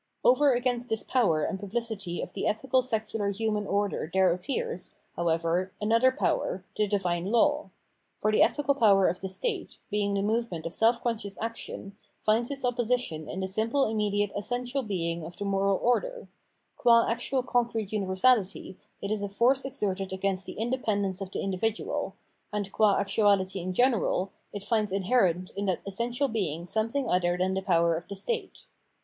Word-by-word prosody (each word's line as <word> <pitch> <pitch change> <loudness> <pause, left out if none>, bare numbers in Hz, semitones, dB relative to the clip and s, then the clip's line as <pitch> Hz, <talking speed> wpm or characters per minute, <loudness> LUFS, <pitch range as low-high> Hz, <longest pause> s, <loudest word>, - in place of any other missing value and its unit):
Over 275 +2 +5
against 245 0 -1
this 220 -1 -1
power 180 -12 +2
and 190 - -2
publicity 205 -3 -3
of - - -8
the - - -2
ethical 255 +4 +2
secular 220 -4 -2
human 210 0 -1
order 200 -5 -1
there 190 -2 +4
appears, 375 - -3 0.2
however, 170 +2 0
another 230 +5 +4
power, 190 -8 -1
the 210 - +1
Divine 180 -3 0
Law. 290 +3 +2 0.5
For 215 - +1
the 215 - +3
ethical 285 -1 +3
power 200 -7 +5
of 180 - -1
the 190 - -4
state, 445 - -3
being 205 -1 0
the 200 - 0
movement 215 -6 -1
of 165 - -4
self 230 +1 +2
conscious 215 -4 -2
action, 225 -3 -5 0.2
finds 225 +3 +1
its 275 -2 -3
opposition 245 -10 -1
in 190 - -4
the 190 - -1
simple 225 +8 +1
immediate 205 -2 0
essen 245 +4 -2
tial 255 -1 -2
being 170 -4 -2
of 170 +2 -9
the 205 - -4
moral 195 0 +2
order; - - 0 0.5
qua 235 -2 +5
actual 240 +3 0
concrete 235 -5 0
universahty, 195 -1 +1 0.3
it 200 - -2
is 215 -1 0
a 200 - -3
force 250 +7 +2
exerted 195 -7 -2
against 190 0 -2
the - - -7
indepen 225 -3 0
dence 190 -1 -2
of 195 - -4
the - - -4
individual; 195 +3 -2 0.4
and, 205 -2 -3
qua 210 -1 +4
actuality 200 -1 +2
in 185 +1 -3
general, 215 -4 +2 0.2
it 205 -1 -6
finds 210 -1 0
inherent 190 -3 +1
in 200 0 -3
that 185 - 0
essential 235 +7 -1
being 175 - -2
something 230 +7 -1
other 175 -2 +2
than 185 +1 +1
the 190 - -1
power 170 -2 +3
of 170 - -6
the 200 - -6
state. 470 - -4
205 Hz, 175 wpm, -28 LUFS, 190-240 Hz, 0.5 s, Over